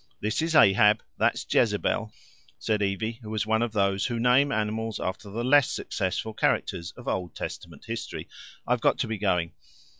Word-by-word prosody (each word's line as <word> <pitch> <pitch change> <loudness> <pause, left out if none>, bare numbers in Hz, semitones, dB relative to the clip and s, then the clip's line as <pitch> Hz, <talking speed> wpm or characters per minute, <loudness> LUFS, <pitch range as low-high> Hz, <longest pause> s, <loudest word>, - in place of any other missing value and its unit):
"This 105 +8 -1
is 165 0 -1
Ahab, 105 -1 +6 0.2
that's - - +1
Jezebel," - - +1 0.5
said 105 -1 -1
Evie, 110 +4 -2
who 110 - -9
was 110 -1 -1
one 110 +1 +1
of 120 -1 0
those 100 -2 +1
who 120 -2 -3
name 125 +4 +4
animals 110 -1 -2
after 95 +2 -4
the 115 +4 -4
less 140 +2 +5
successful 100 +3 -3
characters 85 -4 -1
of 120 - -11
Old 90 -2 -2
Testament - - -7
history. - - -5 0.4
"I've - - 0
got - - +3
to - - -1
be 110 -2 -4
going." 90 -5 0
110 Hz, 175 wpm, -27 LUFS, 100-115 Hz, 0.5 s, Ahab